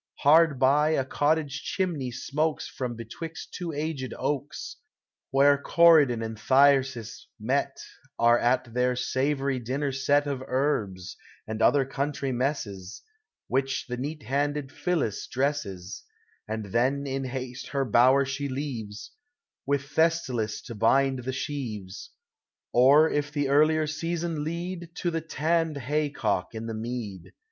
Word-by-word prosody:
Hard 155 0 +5
by, 145 +4 +3
a 135 - 0
cottage 145 +1 0
chimney 170 -9 -2
smokes 150 +5 -2
From 125 -2 -4
betwixt 135 +9 -8
two 175 -2 -4
aged 145 -3 -4
oaks, 145 0 -3 0.5
Where 140 +1 +4
Coryclon 150 -9 +5
and 110 0 -6
Thyrsis, 130 -3 +2
met, 135 +5 -1 0.4
Are 120 +1 +5
at 125 -1 +1
their 125 0 +1
savory 135 +1 0
dinner 135 +4 -2
set 140 +2 +2
Of 140 -3 -3
herbs, 105 -10 -1 0.3
and 110 +1 -5
other 140 -2 +4
country 140 0 -2
messes, 120 -8 -3 0.4
Which 135 +1 -1
the 125 - -4
neat 145 +4 -5
handed 145 +2 -1
Phillis 155 - -2
dresses: 115 -9 -3 0.4
And 110 -2 -5
then 130 +4 +1
in 135 0 -3
haste 130 0 -5
her 140 -1 -1
bower 130 +4 +5
she 140 +1 -3
leaves, 120 -6 -5 0.6
With 140 0 +1
Thestylis 140 -8 0
to 120 - -8
bind 130 +3 +2
the 130 - -1
sheaves; 130 - -5 0.6
Or, 140 +6 +6
if 145 -1 -1
the 145 -2 -1
earlier 155 +2 +4
season 165 0 -3
lead, 170 +1 -5
To 175 - -1
the 165 0 -2
tanned 160 0 0
haycock 140 -8 -1
in 110 0 -5
the 115 - -4
mead. 110 -5 -6
135 Hz, 135 wpm, -27 LUFS, 125-150 Hz, 0.6 s, Or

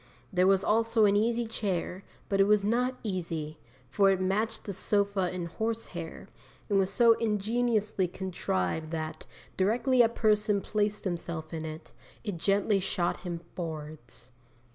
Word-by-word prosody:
There 180 0 +4
was 195 0 +4
also 225 0 +3
an 200 0 +4
easy 230 +3 +2
chair, 195 -4 -3 0.2
but 195 -1 +2
it - - +6
was 210 -1 +4
not 250 +4 +1
easy, 165 -6 -3 0.3
for 195 +10 +3
it 190 -1 +2
matched 215 +4 0
the 200 - -5
sofa 200 -1 +1
in 180 -2 -4
horse 220 +6 -3
hair, 170 -2 -8 0.4
and 200 -1 +3
was 190 -1 +2
so 230 +3 +5
ingeniously 215 -2 +1
contrived 160 - -2
that, 155 -1 -5 0.3
directly 245 +6 +3
a 230 - +5
person 210 -2 +2
placed 210 +1 -1
himself 170 -3 -4
in 160 -1 -4
it, 155 0 -8 0.3
it 205 -6 -3
gently 200 +3 +2
shot 180 -2 -1
him 175 -2 -5
forwards. 150 -7 -7
195 Hz, 150 wpm, -29 LUFS, 170-215 Hz, 0.4 s, it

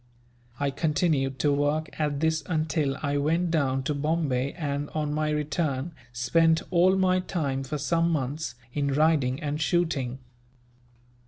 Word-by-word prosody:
I 140 -1 0
continued 150 -3 0
to 145 -1 +3
work 145 +2 +1
at 150 -2 0
this 160 -1 +2
until 155 -4 0
I 145 -1 0
went 165 +4 +1
down 135 -5 +1
to 150 - -1
Bombay 140 -3 0
and, 145 -3 -3
on 150 -1 -1
my 155 0 0
return, 150 0 -1 0.2
spent 160 +7 +2
all 180 +2 +4
my 185 -1 +3
time, 145 -7 -2
for 140 +3 -3
some 165 +4 +1
months, 145 -2 -2 0.2
in 140 -2 0
riding 145 -4 +2
and 150 0 -3
shooting. 150 -7 0
150 Hz, 145 wpm, -27 LUFS, 140-160 Hz, 0.2 s, all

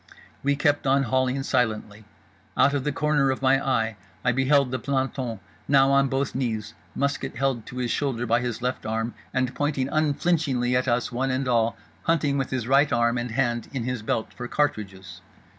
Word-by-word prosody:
We 140 +1 +1
kept 145 0 +1
on 135 +1 +4
hauling 130 +2 0
silently. 110 -4 -1 0.5
Out 140 - +5
of 140 -2 -1
the 150 - +1
corner 145 -1 +2
of 130 0 -2
my 135 +1 +4
eye 115 -5 0 0.3
I 125 - +4
beheld 135 +1 +3
the 130 - -1
planton—now 130 0 0
on 140 0 +4
both 135 0 -1
knees, 110 -5 -2 0.2
musket 140 0 -1
held 135 -5 -1
to 125 - -8
his 125 -2 -1
shoulder 130 -5 -1
by 115 +1 +2
his 120 -1 -4
left 125 +1 -2
arm 115 +2 -2 0.2
and 130 -1 0
pointing 140 -1 -1
unflinchingly 145 -4 +1
at 125 +1 +1
us 120 0 +1
one 130 +2 -1
and 130 +1 -1
all—hunting 140 +5 0
with 135 - -2
his 125 -3 -2
right 140 +3 +4
arm 120 +1 +2
and 120 +1 -3
hand 120 -1 0
in 130 -4 -2
his 125 -1 -3
belt 110 +1 -2
for 120 - -6
cartridges! 95 - -2
130 Hz, 180 wpm, -25 LUFS, 120-140 Hz, 0.5 s, Out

